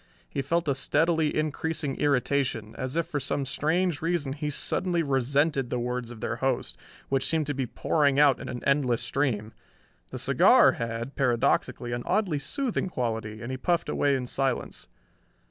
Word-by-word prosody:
He 140 - -3
felt 170 +3 0
a 140 - +3
steadily 160 +3 +1
increasing 155 -1 -2
irritation, 130 -5 0
as 130 +4 -4
if 170 - +1
for 145 - -3
some 140 0 -2
strange 165 +4 0
reason 165 -5 -1
he 150 +1 -3
suddenly 170 +4 0
resented 140 0 +1
the 125 - -1
words 125 0 -3
of 115 -3 -10
their 120 - -2
host, 130 0 -1 0.3
which 135 0 +1
seemed 160 -2 +1
to 145 - -2
be 135 -2 -2
pouring 140 +2 +1
out 145 -3 +5
in - - -7
an 125 - -6
endless 140 -4 +2
stream. 115 -6 -1 0.6
The - - -6
cigar - - +5
had, 115 +3 -4
paradoxically, 120 -1 +1
an 120 0 -2
oddly 185 -6 +1
soothing 250 - -2
quality, 110 -5 -3
and 120 - -5
he 130 - -3
puffed 170 +4 0
away 140 -1 +2
in 130 -1 -2
silence. 135 +2 -2
140 Hz, 170 wpm, -27 LUFS, 125-155 Hz, 0.6 s, out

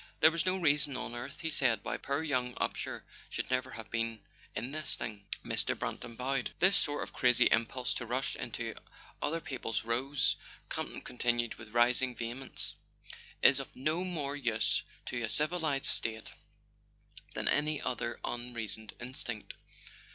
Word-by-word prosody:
"There 160 - +8
was 170 +3 0
no 185 +1 +3
reason 145 -5 +3
on 120 - -4
earth," 120 +3 -6
he 160 -1 -1
said, 125 -8 +3
"why 120 - -1
poor 140 +3 -1
young 125 -5 0
Upsher - - -2 0.3
should - - -3
ever 130 0 +1
have 110 -1 -8
been 115 -1 -1 0.3
in 125 +4 -2
this 155 +1 -1
thing." 105 -4 -6 0.2
Mr. - - 0
Brant - - -3 0.2
bowed. 130 0 0
"This 190 +2 +5
sort 145 -1 +3
of - - -9
crazy 125 -2 +5
impulse 120 +2 +2
to 120 - -4
rush 130 +3 0
into - - -3 0.5
other 165 +3 +1
people's 125 - -3
rows," 130 +5 +1 0.3
Campton - - -3
continued 120 -1 +1
with 110 - -10
rising 125 +1 +4
vehemence, 120 +4 -3 0.7
"is - - +9
of - - -6
no 155 +7 0
more 150 -6 -2
use 115 -6 +2 0.2
to 120 - -2
a 115 - -1
civilized 155 0 +1
state 110 -1 +1 1.0
than - - -1
any 150 0 +2
other 120 -1 -2
un¬ 120 0 -3
reasoned 110 -2 -2
instinct. 120 -3 -4
125 Hz, 160 wpm, -33 LUFS, 120-145 Hz, 1.0 s, is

